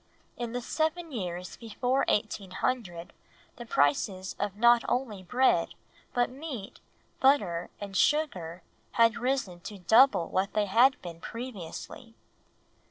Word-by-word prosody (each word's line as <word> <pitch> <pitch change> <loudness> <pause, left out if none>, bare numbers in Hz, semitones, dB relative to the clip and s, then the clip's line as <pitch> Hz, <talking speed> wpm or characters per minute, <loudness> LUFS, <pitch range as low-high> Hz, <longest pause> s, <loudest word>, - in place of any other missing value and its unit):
In 240 -1 -5
the 245 - -2
seven 320 +4 -1
years 180 -6 -5
before 245 +4 -1
1800 195 -3 -2 0.4
the 240 -2 -9
prices 185 +5 +1
of 205 -1 -2
not 235 +1 +5
only 240 -6 -1
bread, 250 +8 +2 0.4
but 245 0 +1
meat, 265 -7 -7 0.4
butter, 200 -11 +2
and 200 -1 -7
sugar, 185 - +1 0.3
had 230 -1 +4
risen 245 -8 -1
to 200 +4 -8
double 220 0 +5
what 190 +1 -1
they 210 -1 +2
had 240 +7 +4
been 170 -2 -8
previously. 230 0 -8
225 Hz, 120 wpm, -29 LUFS, 185-255 Hz, 0.4 s, not